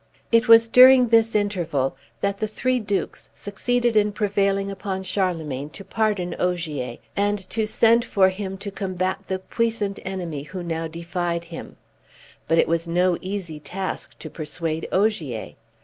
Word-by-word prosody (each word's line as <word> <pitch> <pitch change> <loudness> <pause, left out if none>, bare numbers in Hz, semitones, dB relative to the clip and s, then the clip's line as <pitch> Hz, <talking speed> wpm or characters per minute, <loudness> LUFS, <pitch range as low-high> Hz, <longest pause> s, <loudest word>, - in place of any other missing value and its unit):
It 230 +1 +4
was 230 0 +8
during 250 +1 +8
this 225 -1 +4
interval 170 -11 0 0.3
that 200 0 -1
the 215 - 0
three 255 +4 0
Dukes 205 -3 -3
succeeded 240 +4 -1
in 210 -1 +3
prevailing 200 -1 0
upon 190 0 -4
Charlemagne 160 -8 -2
to 200 - -9
pardon 210 -5 -1
Ogier, 155 -9 -2 0.2
and 205 +1 +1
to 220 -1 0
send 230 +2 +4
for 195 -5 +3
him 190 0 -5
to 200 - -4
combat 185 -2 -2
the 190 - -1
puissant 215 0 -2
enemy 175 -6 -4
who 180 +5 -7
now 165 -1 -3
defied 170 +1 -3
him; 165 -1 -9 0.7
but 165 - +2
it - - +4
was 165 +1 0
no 180 +1 +2
easy 185 -5 -5
task 185 +6 -5
to - - -8
persuade 160 +1 -4
Ogier. 175 - 0
190 Hz, 150 wpm, -23 LUFS, 170-210 Hz, 0.7 s, was